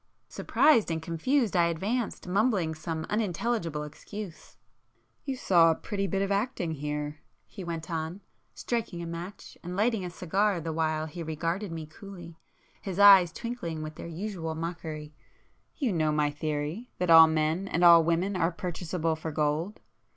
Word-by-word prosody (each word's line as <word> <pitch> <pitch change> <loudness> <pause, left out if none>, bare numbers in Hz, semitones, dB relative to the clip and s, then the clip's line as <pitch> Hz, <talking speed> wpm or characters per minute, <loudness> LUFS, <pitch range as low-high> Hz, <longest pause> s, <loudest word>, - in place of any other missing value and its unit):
Surprised 255 - +3
and 165 -1 -1
confused, 200 - 0
I 170 -1 +5
advanced, 200 +7 -2
mumbling 195 -4 +1
some 160 0 -4
unintelligible 205 -6 -1
excuse. 175 +4 -9 0.7
"You 270 -2 -2
saw 175 -9 +4
a 165 - +3
pretty 195 +2 -3
bit 195 0 0
of 195 - -2
acting 200 -4 -1
here," 150 0 -4 0.3
he 190 - -9
went 165 -2 -5
on, 165 +4 -3 0.3
striking 225 -8 -3
a - - -5
match 170 +4 -8
and 180 +1 -5
lighting 220 -1 +1
a 180 - -4
cigar 185 +3 0
the 160 0 -4
while 155 -1 0
he 170 +2 -7
regarded 165 +5 -3
me 160 -1 -5
coolly, 170 0 -11 0.4
his 190 -2 -5
eyes 195 -4 +8
twinkling 230 -10 -5
with 155 0 -6
their 155 - -8
usual 170 -2 -4
mockery—"you 160 - -6
know 155 -2 +1
my 150 -1 +1
theory, 155 - -3
that 180 -1 +1
all 165 0 +10
men 160 +4 0
and 175 -2 0
all 170 -1 +9
women 170 +4 0
are 175 -1 +1
purchaseable 170 -1 -2
for 160 0 -5
gold? 155 +6 -1
170 Hz, 160 wpm, -28 LUFS, 160-200 Hz, 0.7 s, all